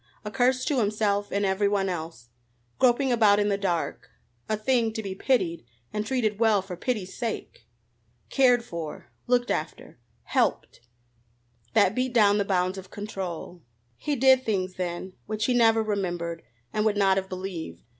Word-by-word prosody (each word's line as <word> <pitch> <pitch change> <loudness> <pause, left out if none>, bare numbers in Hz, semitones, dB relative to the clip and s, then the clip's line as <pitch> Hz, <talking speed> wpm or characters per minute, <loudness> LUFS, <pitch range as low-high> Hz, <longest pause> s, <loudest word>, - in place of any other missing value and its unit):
a 210 - -4
curse 255 +1 +2
to 280 -4 +1
himself 205 -1 0
and 200 0 0
everyone 195 0 +1
else. 160 -9 -5 0.5
Groping 260 +1 +3
about 215 -4 +5
in 205 0 +2
the 200 - +2
dark 175 -4 -2 0.4
a 215 - +1
thing 230 0 +1
to 220 -1 -4
be 195 -2 -4
pitied 190 - 0 0.3
and 210 - -1
treated 220 -6 0
well 220 -4 +3
for 190 -2 -7
pity's 195 -1 -3
sake! 225 - -5 0.6
Cared 250 -3 +4
for 165 -7 -7 0.2
looked 245 0 +2
after 155 -5 -4 0.2
helped! - - -1 0.9
That 185 - +5
beat 255 -1 -1
down 205 -2 +5
the 200 - +1
bounds 185 0 0
of 185 0 -12
control. 185 -4 -6 0.3
He 290 - -2
did 260 0 +5
things 190 -5 -1
then 180 +1 -4
which 215 +1 -1
he 250 - +2
never 225 -2 +4
remembered 175 -5 -2 0.3
and 215 - +1
would 215 -1 +1
not 195 -1 +4
have 190 0 -2
believed. 185 -3 -6
205 Hz, 160 wpm, -26 LUFS, 185-230 Hz, 0.9 s, about